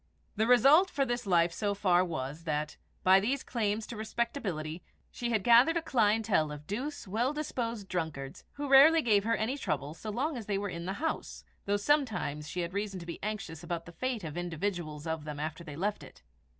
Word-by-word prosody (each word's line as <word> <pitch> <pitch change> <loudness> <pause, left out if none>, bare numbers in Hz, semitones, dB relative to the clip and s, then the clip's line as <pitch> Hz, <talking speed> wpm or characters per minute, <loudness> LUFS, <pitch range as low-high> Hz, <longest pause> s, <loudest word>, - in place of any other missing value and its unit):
The 220 +1 +1
result 275 - +6
for 275 -1 0
this 240 -3 -3
life 170 -2 +3
so 205 +2 -1
far 185 -3 +3
was, 155 -2 -4
that, 150 -1 -2 0.3
by 190 +1 +7
these 260 +7 -1
claims 215 -2 -1
to 235 - -8
respectability, 210 - -3 0.3
she 240 - -3
had 220 -4 +1
gathered 245 +8 +6
a - - 0
clientèle 210 - +2
of 150 0 -8
douce, 255 - -4
well 235 +8 0
disposed 235 -8 -3
drunkards, 160 -7 -4
who 290 0 -4
rarely 295 +4 +7
gave 210 -3 +3
her 230 0 +2
any 245 +7 -2
trouble 150 - -2
so 215 +6 -8
long 265 +7 -1
as 225 - -7
they 200 -2 0
were 200 0 -2
in 170 -1 -6
the 190 - -1
house, 315 +9 -4 0.2
though 205 +1 +2
sometimes 205 - 0
she 180 +3 -3
had 170 +1 -4
reason 200 -1 -3
to 170 - -9
be 170 - -7
anxious 195 -6 -5
about 170 -1 -4
the 175 - -10
fate 235 +5 -3
of 160 0 -6
individuals 170 -3 -3
of 160 -1 -3
them 150 -1 -6
after 155 +3 -4
they 150 -4 -8
left 200 +6 -2
it. - - -14
205 Hz, 205 wpm, -31 LUFS, 165-235 Hz, 0.3 s, by